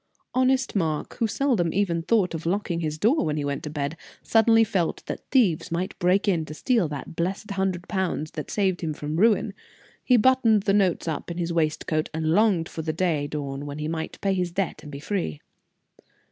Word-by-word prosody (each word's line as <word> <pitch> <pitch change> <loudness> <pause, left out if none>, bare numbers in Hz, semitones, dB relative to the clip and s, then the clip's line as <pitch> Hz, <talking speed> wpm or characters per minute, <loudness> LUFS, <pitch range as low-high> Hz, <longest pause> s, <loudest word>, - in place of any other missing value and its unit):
Honest 260 0 +2
Mark, 160 -6 -1
who 230 - +2
seldom 235 -7 +1 0.3
thought 190 0 +2
of 165 - -3
even 165 - 0
locking 190 -4 -1
his 155 -2 -2
door 235 - +3
when 155 -1 -1
he 145 - -1
went 140 0 -2
to 150 - -5
bed, 145 0 -3 0.3
suddenly 225 0 +5
felt 190 -6 -1
that - - -7
thieves 185 - +2
might 175 +3 -3
break 185 +4 +2
in 175 -5 +2
to 155 - -8
steal 230 -2 +1
that 145 +2 -7
blessed 190 +5 -2
hundred 190 -2 -1
pounds 180 -5 -2
that 150 - -6
saved 190 -4 0
him 155 -3 -2
from 150 +2 -4
ruin. 210 0 +3 0.5
He 250 - +4
buttoned 230 -3 +4
the 200 -2 +2
notes 190 -5 +2
up 160 +1 -3
in 170 - -5
his 170 -1 -2
waistcoat, 155 -1 0
and 160 0 0
longed 190 -3 +3
for 160 - -6
the 155 0 -2
day 160 -4 0
dawn 145 -1 -5
when 145 0 -6
he 150 0 -3
might 160 0 -4
pay 195 -1 +1
his 180 -2 -1
debt 180 -4 -2
and 150 -1 -10
be 140 - -7
free. 150 - -3
175 Hz, 205 wpm, -25 LUFS, 155-205 Hz, 0.5 s, suddenly